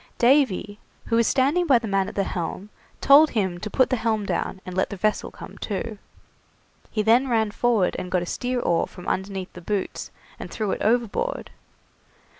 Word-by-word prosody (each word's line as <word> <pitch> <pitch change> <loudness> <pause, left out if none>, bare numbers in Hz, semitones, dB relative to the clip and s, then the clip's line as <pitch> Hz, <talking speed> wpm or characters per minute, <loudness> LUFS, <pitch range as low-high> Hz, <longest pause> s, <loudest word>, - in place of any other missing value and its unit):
Davy, 240 -5 +2 0.3
who 230 - 0
was 230 -1 +3
standing 290 +7 +2
by 265 -5 +6
the 230 -1 -4
man 195 -1 +1
at - - -12
the 200 - +1
helm, 190 +3 -5 0.3
told 295 +3 +7
him 190 -6 -1
to 215 - -5
put 260 +5 +2
the 255 - +2
helm 220 -2 -1
down 190 +1 -2
and 185 - -7
let 190 - +1
the 200 - -6
vessel 215 +3 0
come - - -12
to. 215 +1 -4 0.9
He 215 - -1
then 235 +5 +4
ran 220 -3 +1
forward 225 -5 +1
and 180 - -5
got 180 -1 0
a - - -5
steer 250 +7 -2
oar 170 -6 +1
from 180 - -12
underneath 190 -1 -3
the 180 - -10
boots, 200 +2 -3 0.3
and - - -7
threw 215 -3 -2
it - - -3
overboard. 240 - 0
215 Hz, 195 wpm, -24 LUFS, 190-245 Hz, 0.9 s, told